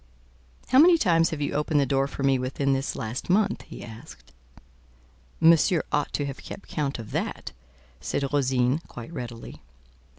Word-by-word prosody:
"How 260 - +5
many 340 +3 +7
times 165 - +3
have 155 -2 -5
you 145 - -1
opened 150 +1 +1
the 140 - +3
door 135 0 +1
for 140 - -6
me 135 -1 +3
within 135 +2 0
this 135 +1 -2
last 115 +8 -5
month?" 200 +3 +2
he - - -10
asked. 110 - -12 1.1
"Monsieur 165 +1 +5
ought 145 -1 0
to 145 - -1
have 140 -1 -6
kept 200 - -10
count 145 -3 -2
of 110 -3 -9
that," - - -3 0.5
said 140 - -2
Rosine, 130 0 +2
quite 120 +7 -10
readily. 120 -5 -8
140 Hz, 165 wpm, -26 LUFS, 130-160 Hz, 1.1 s, many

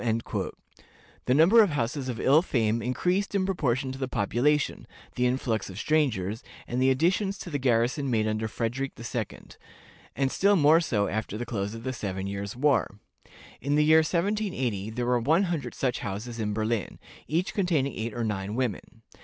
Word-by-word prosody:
The 115 +2 -4
number 180 +10 +7
of 205 - +4
houses 130 -1 -2
of 120 -2 -4
ill 145 +4 +5
fame 115 -8 0
increased 180 - 0
in 190 -1 +2
proportion 135 -8 0
to 135 - -8
the 130 - -2
population, 130 +7 0 0.3
the 125 0 +1
influx 120 -5 -1
of 95 - -9
strangers, 115 -8 0 0.3
and 125 +2 -1
the 130 - +4
additions 185 +9 +1
to 180 - -8
the 145 - -1
garrison 125 +2 +1
made 110 -3 +1
under 110 +1 -1
Frederick 120 +5 -3
II.; 115 -2 -4 0.8
and 135 +1 0
still 200 +1 +3
more 160 0 +5
so 105 -11 0
after 110 -1 -3
the 120 - -4
close 105 -2 -3
of 115 - -9
the 130 +1 -2
seven 95 -5 -4
years' 100 +1 -4
war. 135 -6 +1 0.6
In 140 +2 0
the 150 0 +4
year 160 +1 +7
1780, 165 - -1
there 120 +2 -3
were 125 0 +2
one 160 - +3
hundred 160 -10 -3
such 130 -2 -1
houses 115 +1 -5
in 105 -1 -1
Berlin, 110 -1 -2 0.3
each 170 +5 -1
containing 160 - +1
eight 110 0 -4
or 120 - -2
nine 105 -1 -3
women. 125 -6 -3
125 Hz, 180 wpm, -27 LUFS, 110-150 Hz, 0.8 s, number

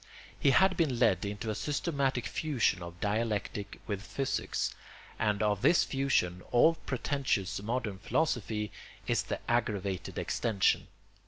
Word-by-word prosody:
He - - +4
had 190 +7 +5
been 150 -8 +1
led 105 -6 +3
into 105 +2 -3
a - - -1
systematic 140 -3 -1
fusion 135 - 0
of 85 0 -8
dialectic 105 -1 -2
with 100 -3 -3
physics, 135 +5 -2 0.5
and 105 -1 +1
of 105 -2 +1
this 170 - +5
fusion 135 -10 0
all 140 +7 +6
pretentious 130 - -1
modern 110 -3 -2
philosophy 110 -5 0 0.3
is - - +2
the - - -4
aggravated 100 -6 -1
extension. 105 -5 +1
110 Hz, 130 wpm, -31 LUFS, 100-135 Hz, 0.5 s, all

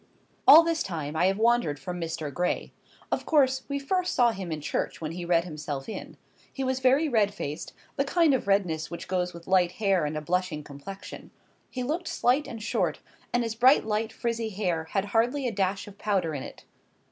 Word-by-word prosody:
All 325 +2 +11
this 330 -1 0
time 155 -4 -4
I 175 +3 +3
have 195 +1 +1
wandered 230 -9 +2
from 180 +4 -5
Mr. 160 -3 -4
Gray. 180 +4 -1 0.4
Of - - 0
course, 265 -4 +3
we 280 - -1
first 360 +6 -1
saw 240 -2 +5
him 190 -5 -6
in 155 - -2
church 150 - -3
when 155 -1 -4
he 175 +1 -5
read 170 -1 +3
himself 150 -5 -5
in. - - -7 0.3
He 270 - -4
was 260 0 0
very 265 +5 +4
red 210 -6 +2
faced, 150 -1 -5 0.2
the 275 - +3
kind 320 +1 +3
of 255 - -1
redness 180 -6 +1
which 170 - -7
goes 180 -1 -1
with 170 -1 -11
light 180 -2 +3
hair 195 -5 +1
and 150 +1 -3
a - - -3
blushing 175 -1 -1
complexion; 150 +8 -9 0.4
he 255 - -4
looked 320 +7 -2
slight 255 +5 +1
and 225 -2 -7
short, - - 0 0.3
and 245 0 +1
his 230 -1 -2
bright 255 +4 +5
light 220 +1 -1
frizzy 230 -1 -2
hair 180 -6 -1
had 195 +4 -1
hardly 240 +6 +1
a - - -1
dash 195 -1 -1
of 200 0 -13
powder 190 -6 0
in 140 - -4
it. - - -10
195 Hz, 205 wpm, -27 LUFS, 170-245 Hz, 0.4 s, All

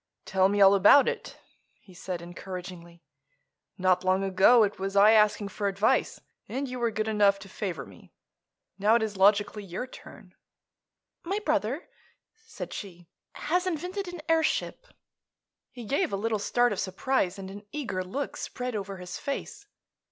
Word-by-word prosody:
"Tell 190 -1 +2
me 205 +1 0
all 195 0 +8
about 205 +8 +6
it," 475 0 -4 0.4
he 185 - -18
said 175 -1 -6
encouragingly. 175 -1 -9 0.7
"Not 185 0 +2
long 185 +1 +2
ago 195 +5 +5
it 205 -1 -2
was 195 +1 -3
I 205 +2 +7
asking 210 -2 +3
for 205 0 -3
advice, 200 +2 +1 0.3
and 275 +2 -3
you 250 0 -6
were 235 -1 +1
good 215 0 -3
enough 205 -2 +3
to 195 0 -12
favor 190 -2 -5
me. - - -17 0.7
Now 210 +3 +4
it 235 - +2
is 215 -2 -3
logically 205 +2 +3
your 190 +5 -5
turn." 255 - -14 0.9
"My 385 +4 -2
brother," 305 - -1 0.6
said - - -7
she, 175 -4 -9 0.2
"has 360 +3 -1
invented 365 +3 -3
an 355 -3 -8
airship." 325 +9 0 0.8
He 245 -2 -10
gave 290 - 0
a 195 - -1
little 220 +1 -1
start 240 +2 +2
of 195 - -5
surprise 190 0 -1
and 190 -1 -8
an 205 +1 -11
eager 215 -11 -3
look 265 +10 -5
spread 250 -1 -5
over 200 -1 -5
his 180 0 -7
face. 410 +9 -5
205 Hz, 160 wpm, -27 LUFS, 190-260 Hz, 0.9 s, all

